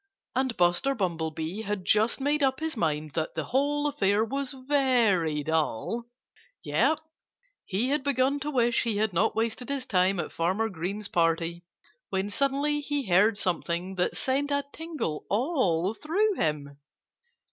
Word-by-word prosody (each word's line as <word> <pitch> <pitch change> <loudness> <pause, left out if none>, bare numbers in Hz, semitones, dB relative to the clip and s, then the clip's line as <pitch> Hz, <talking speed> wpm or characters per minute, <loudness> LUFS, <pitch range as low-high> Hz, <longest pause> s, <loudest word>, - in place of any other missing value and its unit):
And 260 -2 0
Buster 175 +10 +2
Bumblebee 165 -1 -2
had 205 -3 -3
just 215 +6 +3
made 290 +2 +1
up 265 -1 +2
his 320 -1 -3
mind 155 -6 -1
that 160 -1 -2
the - - -1
whole 290 +3 0
affair 215 -7 +2
was 275 +3 -3
very 245 - +2
dull! 160 - -1 0.6
Yes! 315 - +2 0.7
he 210 +7 -1
had 290 +1 +1
begun 275 +1 +1
to 290 +2 -3
wish 240 -4 +2
he 225 -3 -1
had 215 -2 +1
not 195 +6 +2
wasted 230 +3 -2
his 275 -2 -2
time 185 -3 +2
at - - -3
Farmer 190 +7 0
Green's 195 +3 -4
party, 170 0 0 0.4
when 195 +1 -1
suddenly 280 +4 +1
he 290 -2 -2
heard 200 +3 +4
something 180 -1 -1
that 180 -1 -1
sent 275 +2 0
a 285 0 0
tingle 315 - -4
all 205 - +1
through 395 - +1
him. 145 - -2
220 Hz, 150 wpm, -27 LUFS, 175-275 Hz, 0.7 s, heard